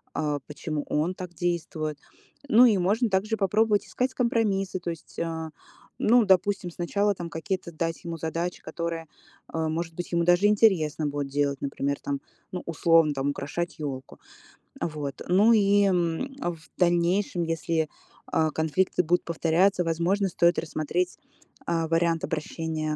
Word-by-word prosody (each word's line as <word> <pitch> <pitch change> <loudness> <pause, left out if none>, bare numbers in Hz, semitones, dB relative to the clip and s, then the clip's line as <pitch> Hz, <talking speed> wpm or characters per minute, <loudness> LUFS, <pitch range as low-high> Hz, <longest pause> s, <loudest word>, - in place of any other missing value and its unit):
а, 150 -2 -1
почему 150 0 -4
он 155 +5 +1
так 180 -2 -8
действует. 160 -3 -2 0.5
Ну 235 +3 +8
и 220 -5 +5
можно 210 +7 +2
также 210 +4 +1
попробовать 210 +2 +2
искать 255 +1 -1
компромиссы. 210 -6 0
То 175 - -4
есть, 165 - -10
а, 160 -1 -3 0.5
ну, 235 +1 +4
допустим, 190 -1 +2
сначала 200 +4 0
там 170 -1 -6
какие-то 170 +2 -4
дать 165 +2 -3
ему 170 -1 -5
задачи, 165 +2 -3
которые, 170 -1 -4 0.4
а, 160 -1 -2
может 165 +1 -3
быть, 175 - -5
ему 170 0 +2
даже 175 +4 +5
интересно 175 -8 +3
будет 145 -1 -3
делать. 140 -1 0
Например, 140 0 -2
там, 140 -1 -2 0.3
ну, 180 - -4
условно, 165 -1 +3
там 135 0 -1
украшать 170 +5 -4
елку. 135 -4 -6 0.6
Вот. 150 -3 -4
Ну 200 +6 +5
и, 205 -1 +4
м, 180 +7 0
в 175 -2 -2 0.2
дальнейшем, 175 +1 +2
если, 165 -1 -1 0.4
а, 160 -1 +1
конфликты 160 +4 +1
будут 175 +2 +1
повторяться, 175 +3 +2
возможно, 175 +4 +1
стоит 170 0 +3
рассмотреть, 165 +3 -2 0.5
а, 165 -1 0
вариант 165 0 +1
обращения 155 -1 -3
170 Hz, 145 wpm, -26 LUFS, 160-190 Hz, 0.6 s, Ну